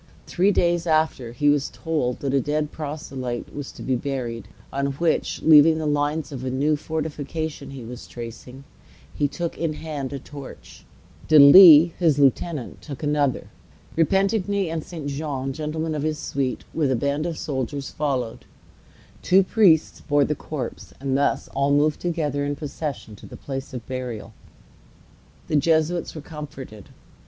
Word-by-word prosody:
Three 190 Hz, +3 st, +2 dB
days 175 Hz, -2 st, +1 dB
after, 155 Hz, -7 st, +1 dB
he 135 Hz, +5 st, -1 dB
was 145 Hz, -1 st, +3 dB
told 150 Hz, -7 st, -2 dB
that 140 Hz, -1 st, -1 dB
a 135 Hz, -, +3 dB
dead 150 Hz, +2 st, -1 dB
proselyte 135 Hz, -5 st, -5 dB
was 145 Hz, -2 st, -6 dB
to -, -, -10 dB
be 130 Hz, -, 0 dB
buried; 120 Hz, -5 st, -4 dB, 0.3 s
on 140 Hz, 0 st, -1 dB
which, 165 Hz, +3 st, -1 dB
leaving 160 Hz, 0 st, +7 dB
the 160 Hz, -, -3 dB
lines 145 Hz, +1 st, -1 dB
of 135 Hz, -3 st, -6 dB
the 130 Hz, -, -3 dB
new 140 Hz, +4 st, +1 dB
fortification 155 Hz, 0 st, -4 dB
he 135 Hz, -3 st, -8 dB
was 120 Hz, +2 st, -9 dB
tracing, 120 Hz, +3 st, -9 dB, 0.5 s
he 145 Hz, -, +1 dB
took 170 Hz, +4 st, -5 dB
in 165 Hz, -2 st, -1 dB
hand 150 Hz, -4 st, -5 dB
a 140 Hz, -, -4 dB
torch, 140 Hz, 0 st, -12 dB, 0.4 s
De 155 Hz, -, +6 dB
Lisle, 160 Hz, +2 st, +10 dB
his 160 Hz, -5 st, +3 dB
lieutenant, 140 Hz, 0 st, 0 dB
took 140 Hz, -1 st, -8 dB
another, 145 Hz, -3 st, 0 dB, 0.4 s
Repentigny 195 Hz, +2 st, +1 dB
and 160 Hz, -2 st, -3 dB
St. 165 Hz, -5 st, -8 dB
Jean, 140 Hz, -2 st, -3 dB
gentlemen 155 Hz, +2 st, -3 dB
of 150 Hz, -, -2 dB
his 155 Hz, 0 st, -1 dB
suite, 135 Hz, -3 st, -3 dB
with 150 Hz, -4 st, +1 dB
a 130 Hz, -, +2 dB
band 140 Hz, +6 st, -1 dB
of 165 Hz, -2 st, -4 dB
soldiers 140 Hz, 0 st, -4 dB
followed, 130 Hz, -6 st, -3 dB, 0.8 s
two 190 Hz, +2 st, +4 dB
priests 185 Hz, -6 st, +3 dB
bore 145 Hz, -2 st, +2 dB
the 150 Hz, -, 0 dB
corpse, 145 Hz, -4 st, -6 dB
and 135 Hz, -1 st, -1 dB
thus 140 Hz, +1 st, +1 dB
all 140 Hz, +1 st, 0 dB
moved 145 Hz, +1 st, +2 dB
together 155 Hz, -5 st, -1 dB
in 145 Hz, 0 st, -2 dB
procession 145 Hz, -6 st, -6 dB
to -, -, -13 dB
the -, -, -11 dB
place 135 Hz, 0 st, -6 dB
of 125 Hz, -3 st, -7 dB
burial. 125 Hz, -4 st, -6 dB, 1.1 s
The 150 Hz, -, +1 dB
Jesuits 160 Hz, +3 st, +1 dB
were 155 Hz, -, -6 dB
comforted. 140 Hz, -, -9 dB
145 Hz, 160 wpm, -23 LUFS, 135-160 Hz, 1.1 s, Lisle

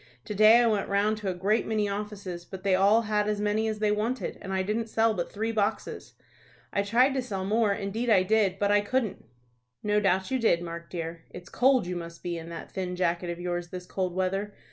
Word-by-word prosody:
To -, -, -4 dB
day 215 Hz, +3 st, +7 dB
I -, -, +3 dB
went 210 Hz, -3 st, +1 dB
round 205 Hz, +2 st, +2 dB
to 210 Hz, -2 st, -3 dB
a -, -, -1 dB
great 200 Hz, +5 st, +1 dB
many 215 Hz, -2 st, 0 dB
offices, 200 Hz, -3 st, -5 dB
but 190 Hz, +1 st, -10 dB
they 195 Hz, -1 st, +2 dB
all 200 Hz, +5 st, +4 dB
had 210 Hz, -1 st, 0 dB
as 210 Hz, -1 st, -1 dB
many 210 Hz, +1 st, 0 dB
as 215 Hz, -1 st, -2 dB
they 210 Hz, 0 st, +1 dB
wanted, 225 Hz, +5 st, -2 dB
and 195 Hz, -, -6 dB
I 190 Hz, 0 st, 0 dB
didn't 220 Hz, +3 st, -2 dB
sell 225 Hz, 0 st, +2 dB
but 175 Hz, -4 st, -3 dB
three 220 Hz, +2 st, -2 dB
boxes. 215 Hz, -1 st, -2 dB, 0.6 s
I 200 Hz, -, +2 dB
tried 240 Hz, +7 st, +3 dB
to 265 Hz, -, 0 dB
sell 195 Hz, -6 st, -4 dB
more, 215 Hz, +1 st, +2 dB
indeed 210 Hz, +4 st, -2 dB
I 195 Hz, -4 st, +5 dB
did, 200 Hz, -1 st, +2 dB
but 205 Hz, +1 st, +1 dB
I 205 Hz, 0 st, +4 dB
couldn't." 225 Hz, 0 st, -2 dB, 0.6 s
"No 210 Hz, 0 st, +2 dB
doubt 190 Hz, +2 st, +1 dB
you 260 Hz, -, +1 dB
did, 175 Hz, -7 st, +2 dB
Mark, 170 Hz, 0 st, -7 dB
dear. 165 Hz, -1 st, -6 dB
It's 175 Hz, 0 st, -11 dB
cold 255 Hz, -4 st, +3 dB
you 180 Hz, 0 st, -4 dB
must 170 Hz, -1 st, -8 dB
be 175 Hz, -1 st, -2 dB
in 165 Hz, 0 st, -7 dB
that 170 Hz, -, -8 dB
thin 180 Hz, -2 st, -3 dB
jacket 175 Hz, -1 st, 0 dB
of 170 Hz, 0 st, -4 dB
yours 175 Hz, 0 st, -3 dB
this 180 Hz, 0 st, -7 dB
cold 185 Hz, -1 st, -3 dB
weather. 195 Hz, +2 st, -1 dB
200 Hz, 230 wpm, -27 LUFS, 180-215 Hz, 0.6 s, day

